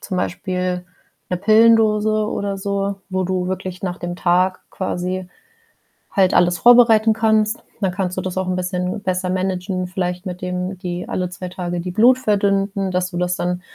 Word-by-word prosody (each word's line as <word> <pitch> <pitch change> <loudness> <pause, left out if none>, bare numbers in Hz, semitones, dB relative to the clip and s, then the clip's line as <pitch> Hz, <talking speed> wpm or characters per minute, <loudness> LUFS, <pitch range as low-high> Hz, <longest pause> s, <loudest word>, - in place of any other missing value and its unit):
zum 190 - -5
Beispiel 180 0 -2 0.5
‘ne 180 - 0
Pillendose 215 +1 +4
oder 200 -2 -2
so, 200 0 -2
wo 185 0 0
du 185 0 -1
wirklich 185 -1 -5
nach 180 -1 -3
dem 175 0 -5
Tag 185 +1 +2
quasi 185 0 -3 0.8
halt 190 -2 +3
alles 175 0 +3
vorbereiten 230 -2 +6
kannst? 220 0 +1 0.2
Dann 190 -2 +1
kannst 185 -1 -3
du - - 0
das 185 0 -5
auch 190 0 -1
‘n 185 - 0
bisschen 180 +1 -2
besser 185 -1 -1
managen, 185 0 -2
vielleicht 180 0 -3
mit 180 -1 -6
dem 180 +1 -3
die 180 -2 -5
alle 180 -1 -2
2 180 0 -7
Tage 175 -1 -4
die 180 +1 -5
Blut 240 +7 +5
verdünnten, 200 -3 0
dass 180 0 -1
du 175 - -5
das 180 0 0
dann 180 0 -2
185 Hz, 175 wpm, -20 LUFS, 180-200 Hz, 0.8 s, vorbereiten